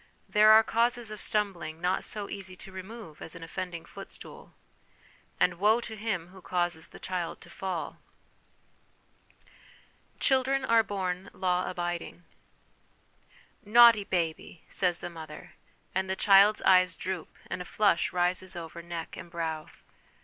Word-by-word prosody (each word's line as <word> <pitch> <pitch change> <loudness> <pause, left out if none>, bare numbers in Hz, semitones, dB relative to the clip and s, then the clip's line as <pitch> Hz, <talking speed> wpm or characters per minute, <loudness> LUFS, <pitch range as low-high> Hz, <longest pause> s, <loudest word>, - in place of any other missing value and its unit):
There 215 +1 +6
are 220 +1 +8
causes 235 0 +1
of 215 - -7
stumbling 180 -8 -1
not 180 +2 0
so 205 -2 -3
easy 190 -2 -7
to 190 - -11
remove 190 -3 -9
as 160 - -7
an 165 - -9
offending 175 0 -5
footstool; - - -11 0.8
and 175 -1 +2
woe 215 +4 +4
to 225 -2 -6
him 200 -6 -3
who 190 0 -14
causes 175 -3 -1
the - - -13
child 180 -3 -4
to - - -14
fall! 185 -4 -4 2.2
Children 265 0 +2
are 230 -2 +5
born 190 -2 -3
Law 180 -1 0
abiding.' 175 -1 -4 1.4
Naughty 230 0 +7
baby! 170 -3 -3
' - - -34
says 180 -2 +2
the - - -4
mother; 160 -2 -10 0.4
and 190 0 -1
the 190 - 0
child's 200 +2 +5
eyes 185 -1 +5
droop, 185 -3 -5
and - - -4
a - - -6
flush 200 -3 +2
rises 180 +1 0
over 170 0 -7
neck 170 -1 -6
and - - -9
brow. 160 -2 -3
185 Hz, 140 wpm, -29 LUFS, 175-210 Hz, 2.2 s, are